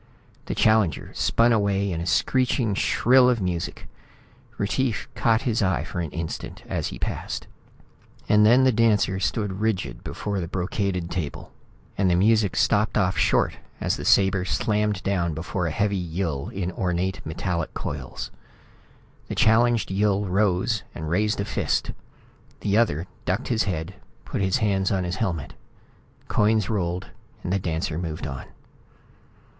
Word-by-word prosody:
The - - -2
challenger 110 -8 +2
spun 115 +1 +3
away 100 -2 +1
in 85 -1 -2
a 85 - -4
screeching 125 +1 +2
shrill 125 +5 +4
of 120 -2 +2
music. 90 -3 -3 0.7
Retief 110 +3 -1
caught 115 0 +2
his 115 -4 0
eye 95 -3 +1
for - - -5
an 85 -3 -2
instant 80 0 -6
as - - -2
he - - -6
passed. - - -4 0.8
And 105 0 +5
then 120 +5 +6
the 130 - +5
dancer 105 -4 +2
stood 100 -2 -1
rigid 110 -4 -1
before 100 -1 -3
the 85 - -3
brocaded 90 -1 -2
table 80 -3 -4 0.5
and 95 -2 +3
the 90 - +3
music 105 0 +3
stopped 105 +1 +2
off 95 -3 +2
short - - +2 0.2
as - - 0
the - - -6
sabre 95 -1 +4
slammed 105 0 0
down 85 -5 0
before 90 +2 -2
a - - 0
heavy 100 +3 0
Yill 85 -5 -3
in 95 -2 -3
ornate 90 +1 -2
metallic 85 +1 -3
coils. - - -5 1.0
The - - -4
challenged 115 -2 +3
Yill 100 +1 +1
rose 100 +3 +1
and 80 -1 -5
raised 105 +4 +1
a 100 - 0
fist. - - -1 0.7
The 100 -1 +1
other 95 -8 +2 0.2
ducked 95 +7 -1
his 115 -3 +1
head, 90 -2 -3 0.3
put - - -3
his 95 +2 +2
hands 100 -4 +1
on 95 -2 +1
his 90 +1 -3
helmet. 85 - -2 0.7
Coins 105 0 +2
rolled. 90 -3 -2 0.3
The 95 +3 0
dancer 80 -2 -2
moved 80 -2 -4
on. 65 -3 -5
95 Hz, 150 wpm, -25 LUFS, 90-105 Hz, 1.0 s, then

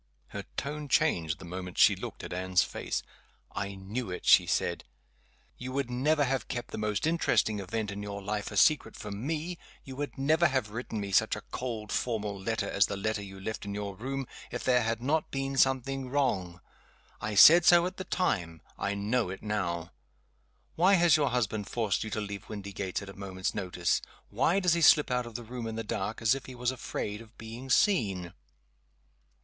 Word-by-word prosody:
Her - - -6
tone 150 +2 -3
changed 80 - +2
the - - -11
moment 90 +1 -6
she - - +6
looked - - -7
at - - -6
Anne's 95 0 +2
face. - - -3 0.5
"I 100 0 -4
knew 100 +4 -5
it!" 90 - -6
she - - +7
said. - - 0 0.8
"You 130 +1 -5
would 135 -2 -1
never 145 +5 +2
have 135 -1 -1
kept 120 - -5
the - - -5
most 105 +1 -1
interesting 155 -9 +2
event 105 +2 -3
in 100 +1 -5
your 100 0 -5
life 105 +1 -3
a - - -6
secret 145 -8 +4
from 105 +4 -6
me 165 +2 -3 0.2
you 130 - -9
would 140 -2 -5
never 160 +5 +3
have 130 -7 -1
written 115 -1 -4
me 100 -1 -4
such - - +3
a - - -8
cold 115 -5 -4
formal 105 -4 -1
letter 100 +1 -2
as 100 -1 +3
the 100 - -4
letter 110 +1 -1
you 95 -1 -9
left 110 +3 -5
in 100 0 -5
your 100 -1 -4
room 135 +5 -4 0.2
if - - -5
there 125 -1 +4
had 115 +1 -1
not 155 +4 +1
been 135 0 -3
something 135 0 +1
wrong. 95 -11 0 0.6
I 105 0 -3
said 165 - +9
so 175 0 +6
at 185 +1 -4
the 185 - -4
time. 85 - -1 0.2
I 100 +1 -1
know 105 +1 0
it 95 - -7
now! 90 -5 -2 0.8
Why 185 +4 +5
has 170 -4 +5
your 145 -3 +2
husband 110 -4 -1
forced 110 -5 0
you 110 - -5
to 110 - -2
leave 100 -1 -6
Windygates 100 -2 -4
at 100 - -9
a - - -9
moment's 95 -2 -4
notice? 90 -3 0 0.3
Why 185 +4 +2
does 180 -3 +3
he 170 - +1
slip 150 -3 +6
out 125 -1 0
of 115 - -11
the 120 - -4
room 120 0 -6
in 110 - -4
the 115 - -3
dark, 115 +1 -3
as 110 - +5
if 135 0 -5
he 130 - -8
was 125 +1 0
afraid 105 -4 -4
of 115 0 -16
being 115 +4 -8
seen? 100 - +2
110 Hz, 200 wpm, -30 LUFS, 100-135 Hz, 0.8 s, said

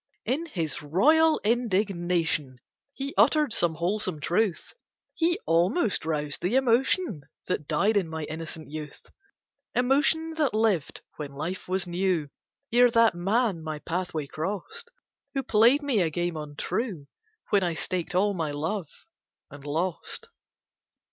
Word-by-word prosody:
In 285 +9 -1
his 165 - -2
royal 305 - +4
indignation 180 - 0 0.4
He 275 +1 -4
uttered 300 -4 +4
some 170 -6 +2
wholesome 185 0 -1
truth 180 +5 0 0.4
He 340 +1 +1
almost 175 - +2
roused 150 -2 -2
the 185 +8 0
emotion 265 - +2 0.3
That 150 -5 -2
died 215 +2 +2
in 190 -5 +1
my 160 -1 -4
innocent 160 0 -7
youth; 150 -1 -8 0.7
Emotion 290 +6 +2
that 280 -8 +2
lived 215 -8 +1 0.2
when 145 -2 -6
life 175 +6 -4
was 185 0 0
new, 175 -4 -1 0.4
Ere 245 +1 +6
that 230 -2 +4
man 195 +1 0
my 155 -1 -4
pathway 165 -1 -3
crossed, 205 - -5 0.5
Who 270 - 0
played 240 +5 +4
me 260 -8 +2
a 165 - +2
game 175 +2 -2
untrue, 155 - -3 0.5
When 200 -2 +4
I 175 -3 0
staked 180 +1 -3
all 200 +2 +3
my 165 -5 -2
love, 160 +4 -3 0.6
and 145 0 -11
lost. 170 - -3
185 Hz, 135 wpm, -27 LUFS, 160-235 Hz, 0.7 s, Ere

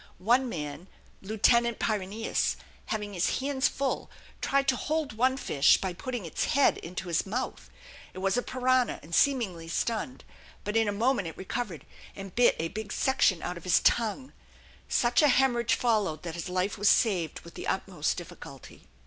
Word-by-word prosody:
One 245 +6 +2
man, 150 -1 -6 0.3
Lieutenant 230 +3 +2
Pyrineus, 215 +1 -1 0.3
having 210 -2 -3
his 180 -1 0
hands 275 0 +1
full, 275 -1 -2 0.3
tried 275 0 +1
to 260 - +3
hold 310 -2 -2
one 255 +4 +2
fish 145 - +4
by 190 -2 -3
putting 245 +2 -5
its 160 - -2
head 280 0 +3
into 180 +2 -6
his 170 +2 0
mouth; 245 +6 -4 0.4
it - - -14
was 190 +1 0
a 245 - +2
piranha 255 -1 +1
and 165 +3 -12
seemingly 205 - +1
stunned, 230 +8 -2 0.4
but 210 - -3
in 225 -1 +3
a - - +1
moment 220 -1 +1
it 165 - -8
recovered 190 -3 -4 0.3
and 195 -2 -8
bit 245 0 +4
a 165 +1 -2
big 215 +1 -6
section 205 -9 +2
out 175 0 -4
of 170 - -11
his 180 -1 +4
tongue. 235 +4 +1 0.6
Such 240 +2 +3
a 300 - +6
hemorrhage 250 -3 +3
followed 210 -10 0
that 170 -2 -5
his 170 +2 -5
life 185 +2 -1
was 205 - +4
saved 180 -9 +2
with 170 - -13
the - - -7
utmost - - -1
difficulty. - - -11
215 Hz, 175 wpm, -28 LUFS, 180-250 Hz, 0.6 s, a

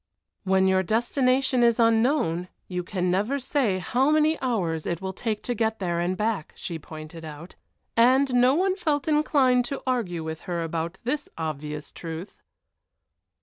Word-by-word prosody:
When 190 0 +3
your 190 0 +3
destination 255 +5 +2
is 235 0 +4
unknown 225 - +2 0.2
you 180 -1 -3
can 180 -1 -1
never 210 +9 +1
say 260 -7 0
how 245 +9 +1
many 310 +1 +3
hours 180 -11 -1
it 170 - -2
will 190 0 -4
take 215 +1 -3
to 245 - -1
get 220 -1 0
there 175 -3 -1
and 180 +2 -1
back, 210 -6 -2
she 165 -2 -5
pointed 155 +1 -10
out. 155 +3 -9 0.4
And 255 +3 +4
no 250 +2 +5
one 375 +3 +2
felt 300 -6 -1
inclined 285 -5 +3
to 275 - -5
argue 215 -11 -1
with 160 0 -5
her 170 -1 -1
about 165 0 -3
this 285 +5 -2
obvious 150 -1 -5
truth! 165 +3 -8
215 Hz, 160 wpm, -25 LUFS, 170-255 Hz, 0.4 s, no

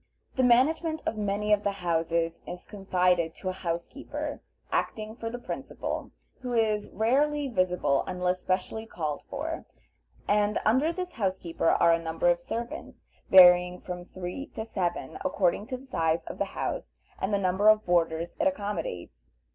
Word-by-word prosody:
The 260 - +2
management 310 +6 +3
of - - -1
many 210 0 0
of 205 - +3
the 200 -1 0
houses 165 -2 -1
is 180 +1 -7
confided 180 -4 +1
to 185 - -4
a 185 - -6
housekeeper, 280 - -4 0.3
acting 215 0 -2
for 230 -1 -4
the 245 - -5
principal, 245 - -5 0.3
who 250 -1 -4
is 215 -2 +1
rarely 285 +6 +1
visible 180 - +1
unless 180 0 -1
specially 190 +5 -2
called 155 -7 -3
for, 315 +4 -5 0.6
and 210 +1 +2
under 260 +9 +3
this 360 +1 -4
housekeeper 185 -5 -1
are 170 0 +5
a 165 - +1
number 165 +1 +1
of 175 0 +2
servants, 235 +6 -6 0.2
varying 180 -1 +8
from 180 -1 -6
three 185 +9 -6
to 220 - -4
seven, 185 -6 -3
according 195 +2 +1
to 255 - -3
the 260 - -14
size 165 -9 0
of - - -8
the - - +2
house - - -3 0.2
and 190 - -1
the 200 - +3
number 190 +2 +1
of 215 0 +5
boarders 170 -1 +1
it 310 - +3
accommodates. 165 - -4
195 Hz, 160 wpm, -28 LUFS, 175-230 Hz, 0.6 s, varying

